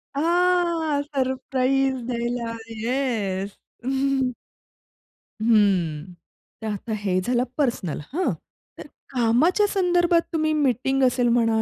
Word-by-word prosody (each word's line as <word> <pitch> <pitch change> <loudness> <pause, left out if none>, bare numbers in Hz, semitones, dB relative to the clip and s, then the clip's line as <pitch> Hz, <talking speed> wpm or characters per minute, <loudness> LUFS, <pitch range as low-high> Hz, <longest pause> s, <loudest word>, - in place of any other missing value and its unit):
हां, 340 -2 +2
सरप्राईज 265 -1 0
द्यायला. 235 -1 -2 0.3
येस. 220 -6 -2 1.8
हं. 185 -7 +2 0.5
तर 220 - -4
आता 215 +2 -4
हे 185 -2 +1
झालं 245 +3 +1
पर्सनल. 235 - -1
हां. 365 +3 +1 0.5
तर - - -9 0.2
कामाच्या 275 - +3
संदर्भात 350 -3 +2
तुम्ही 310 -1 +1
मीटिंग 270 -1 +1
असेल 250 -1 +3
म्हणा, 230 -2 +2
255 Hz, 95 wpm, -24 LUFS, 225-305 Hz, 1.8 s, कामाच्या